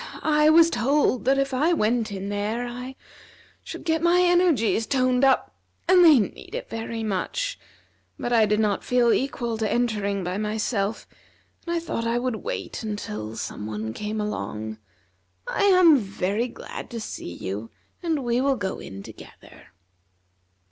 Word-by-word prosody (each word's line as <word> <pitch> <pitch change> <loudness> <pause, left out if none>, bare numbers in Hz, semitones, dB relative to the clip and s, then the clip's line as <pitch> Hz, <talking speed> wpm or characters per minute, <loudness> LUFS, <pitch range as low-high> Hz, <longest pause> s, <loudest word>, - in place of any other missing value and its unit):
I 300 0 +4
was 330 +1 +6
told 255 +1 +1
that 270 +1 +3
if 275 0 0
I 305 +7 +2
went 225 -5 +1
in 195 0 -5
there 210 +4 -2
I 250 +2 -7 0.7
should - - -8
get 320 -2 0
my 345 +1 +4
energies 340 - +3
toned 255 -1 +2
up, 270 -1 +3 0.3
and 365 -1 +6
they 315 -4 +8
need 205 -5 -3
it - - -6
very 225 0 -4
much; 485 - -2 0.6
but 240 - -2
I 225 -2 +5
did 210 +1 +1
not 210 -2 +1
feel 245 -2 +3
equal 240 -4 -2
to 220 -2 0
entering 210 -5 0
by 180 +3 -3
myself, 215 0 -2 0.6
and 340 - -1
I - - +1
thought 230 -8 -3
I 235 +1 +1
would 245 -2 -1
wait - - -5
until 110 - -5
some 105 -1 -5
one 110 +1 -4
came 210 - -4
along. 110 - -4 0.7
I - - +1
am 365 -6 +7
very 205 +1 -1
glad 235 - -9
to 235 - -5
see 150 - -6
you, 100 +4 -5 0.3
and 320 -6 -1
we 240 +1 +1
will 275 0 +2
go 195 -3 -3
in 95 0 -9
together." - - -14
235 Hz, 160 wpm, -25 LUFS, 205-275 Hz, 0.7 s, they